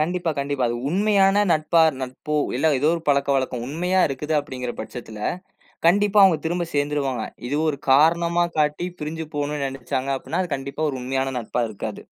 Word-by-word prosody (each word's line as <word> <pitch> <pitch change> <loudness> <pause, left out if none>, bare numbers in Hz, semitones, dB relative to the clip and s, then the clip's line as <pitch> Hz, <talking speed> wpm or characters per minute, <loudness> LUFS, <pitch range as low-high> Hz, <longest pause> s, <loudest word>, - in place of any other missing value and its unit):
கண்டிப்பா 175 +2 0
கண்டிப்பா. 140 -2 -1
அது 120 - -2
உண்மையான 200 +2 +3
நட்பா 155 +1 +2 0.2
நட்போ, 130 +4 -4 0.2
இல்ல 145 +5 +1
ஏதோ 150 - +2
ஒரு 165 - -4
பழக்கவழக்கம். 135 -3 +1
உண்மையா 180 +5 0
இருக்குது 150 +3 -3
அப்படிங்கிற 125 -3 -5
பட்சத்துல, 110 -3 -8 0.7
கண்டிப்பா 205 +3 +4
அவுங்க 185 -4 +5
திரும்ப 175 +1 -1
சேந்துருவாங்க. 145 -3 -1 0.3
இது 145 - 0
ஒரு 140 -3 -1
காரணமா 170 +4 +4
காட்டி, 150 +3 +1
பிரிஞ்சு 160 +2 -4
போணும்னு 145 0 -2
நெனைச்சாங்க 135 0 -3
அப்படின்னா, 185 - -2
அது 175 - -4
கண்டிப்பா 140 +3 -5
ஒரு 135 - -4
உண்மையான 135 +1 -1
நட்பா 120 +1 -2
இருக்காது. 105 - -6
150 Hz, 160 wpm, -23 LUFS, 135-170 Hz, 0.7 s, அவுங்க